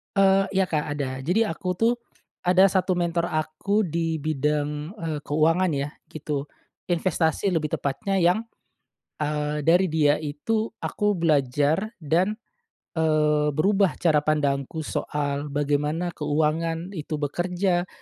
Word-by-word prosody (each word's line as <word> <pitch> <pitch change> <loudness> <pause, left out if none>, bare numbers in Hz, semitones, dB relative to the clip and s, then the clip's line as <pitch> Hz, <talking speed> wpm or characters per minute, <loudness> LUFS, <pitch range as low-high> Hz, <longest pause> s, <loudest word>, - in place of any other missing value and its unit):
Eee, 195 0 +5
iya 190 -1 +2
Kak 150 -3 -1
ada 145 -2 -2
jadi 205 +9 +2
aku 185 - -8
tuh, 225 +6 +2 0.5
ada 185 +2 +6
1 190 -1 +1
mentor 170 0 0
aku 155 +7 0
di 165 0 -1
bidang, 150 +1 -1
eee, 160 -4 -3
keuangan 165 +4 +2
ya 140 -1 -1 0.2
gitu, 150 -2 -3 0.5
investasi 170 +1 +1
lebih 160 -5 0
tepatnya 190 +8 -1
yang, 180 +5 +3 0.8
eee, 150 0 -1
dari 175 +1 +4
dia 150 -2 +4
itu 160 +10 -2
aku 210 -3 -1
belajar 150 - +2
dan, 180 - +1 0.6
eee, 150 -1 +2
berubah 195 +3 +2
cara 160 -3 +2
pandangku 145 0 0
soal 145 -1 -2
bagaimana 150 +4 0
keuangan 160 +3 -1
itu 155 +1 -5
bekerja, 175 +4 0
160 Hz, 125 wpm, -25 LUFS, 150-180 Hz, 0.8 s, ada